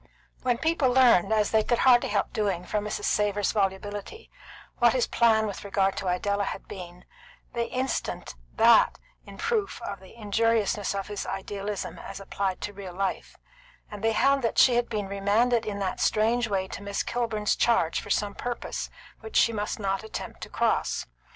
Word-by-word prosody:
When 245 Hz, -2 st, +1 dB
people 320 Hz, -1 st, +2 dB
learned, 245 Hz, -7 st, +5 dB
as 215 Hz, -2 st, +2 dB
they 220 Hz, -, +4 dB
could 240 Hz, +2 st, +1 dB
hardly 245 Hz, -1 st, +5 dB
help -, -, -1 dB
doing 195 Hz, -5 st, -1 dB
from 210 Hz, +1 st, -2 dB
Mrs. 210 Hz, -, -4 dB
Savor's 205 Hz, -1 st, +1 dB
volubility, 205 Hz, -, -3 dB, 0.5 s
what -, -, +5 dB
his -, -, +2 dB
plan 220 Hz, -2 st, +3 dB
with 205 Hz, -2 st, -5 dB
regard 195 Hz, -1 st, +1 dB
to 190 Hz, -, -3 dB
Idella 200 Hz, +3 st, 0 dB
had -, -, -6 dB
been, 180 Hz, -2 st, -9 dB, 0.5 s
they 235 Hz, -1 st, -1 dB
instanced 255 Hz, -, -3 dB, 0.2 s
that -, -, +5 dB, 0.3 s
in 200 Hz, 0 st, -11 dB
proof 440 Hz, -4 st, -1 dB
of 200 Hz, -, -5 dB
the 190 Hz, +2 st, -15 dB
injuriousness 215 Hz, -2 st, 0 dB
of 195 Hz, -1 st, -2 dB
his 205 Hz, -1 st, -5 dB
idealism 200 Hz, +1 st, -4 dB
as -, -, -8 dB
applied 195 Hz, -1 st, -3 dB
to 205 Hz, -, -4 dB
real 190 Hz, -3 st, -8 dB
life; 195 Hz, 0 st, -3 dB, 0.6 s
and 210 Hz, 0 st, -8 dB
they 225 Hz, 0 st, +2 dB
held 275 Hz, +4 st, +3 dB
that 230 Hz, -, -1 dB
she 255 Hz, -, +7 dB
had 240 Hz, 0 st, +1 dB
been 210 Hz, -3 st, -2 dB
remanded 215 Hz, +4 st, +1 dB
in 205 Hz, -1 st, -3 dB
that 195 Hz, -2 st, -2 dB
strange 225 Hz, +2 st, +2 dB
way 190 Hz, -3 st, -1 dB
to -, -, -7 dB
Miss 200 Hz, 0 st, -2 dB
Kilburn's 225 Hz, -3 st, -1 dB
charge 230 Hz, -9 st, +2 dB
for -, -, -11 dB
some 205 Hz, 0 st, 0 dB
purpose 245 Hz, +2 st, -4 dB, 0.3 s
which 440 Hz, -, -10 dB
she 230 Hz, -, +4 dB
must 210 Hz, 0 st, -2 dB
not 195 Hz, 0 st, -1 dB
attempt 220 Hz, -, -7 dB
to -, -, -7 dB
cross. -, -, 0 dB
210 Hz, 180 wpm, -27 LUFS, 195-235 Hz, 0.6 s, she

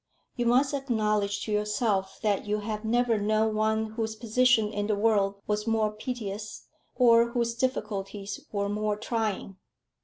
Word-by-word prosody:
You 240 Hz, -2 st, 0 dB
must 265 Hz, +4 st, +3 dB
acknowledge 215 Hz, -6 st, 0 dB
to 215 Hz, -, -4 dB
yourself 210 Hz, -2 st, 0 dB
that 210 Hz, -1 st, 0 dB
you 210 Hz, 0 st, 0 dB
have 215 Hz, 0 st, -4 dB
never 235 Hz, 0 st, +2 dB
known 215 Hz, +1 st, +1 dB
one 220 Hz, +1 st, +1 dB
whose 220 Hz, -1 st, -3 dB
position 230 Hz, -1 st, +2 dB
in 205 Hz, 0 st, -2 dB
the 215 Hz, -, +1 dB
world 200 Hz, -2 st, +2 dB
was 210 Hz, +1 st, -1 dB
more 220 Hz, -1 st, +2 dB
piteous, 210 Hz, -2 st, -6 dB, 0.3 s
or 235 Hz, -2 st, +5 dB
whose 235 Hz, -2 st, 0 dB
difficulties 205 Hz, -5 st, -3 dB
were 200 Hz, -1 st, -1 dB
more 210 Hz, 0 st, -1 dB
trying." 215 Hz, -3 st, -3 dB
215 Hz, 150 wpm, -28 LUFS, 210-230 Hz, 0.3 s, or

